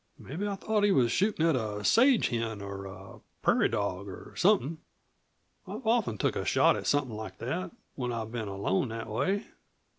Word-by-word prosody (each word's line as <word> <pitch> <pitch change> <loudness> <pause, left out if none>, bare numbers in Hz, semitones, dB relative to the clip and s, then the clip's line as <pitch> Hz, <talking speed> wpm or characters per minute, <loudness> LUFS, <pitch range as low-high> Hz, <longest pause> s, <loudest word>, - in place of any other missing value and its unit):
"Mebbe 175 +10 -4
I 200 - -2
thought 210 +1 0
he 205 - +5
was 125 -9 +3
shootin' 195 -5 +2
at 165 -3 +4
a 105 -4 -3
sage 255 0 +5
hen, 115 -2 -2
or 100 -1 -6
a 95 0 -11 0.2
prairie - - +4
dog 100 -1 -2
or 95 - -9
somethin'. 165 - +2 0.9
I've - - -7
often 225 - +2
took - - 0
a - - -1
shot - - +4
at - - -4
somethin' 135 -6 +1
like 105 -3 -7
that 135 - -3 0.2
when 125 -2 -3
I've 110 -1 -4
been 115 -3 -3
alone 100 +3 0
that 115 0 -5
way." 145 - -1
120 Hz, 185 wpm, -29 LUFS, -, 0.9 s, he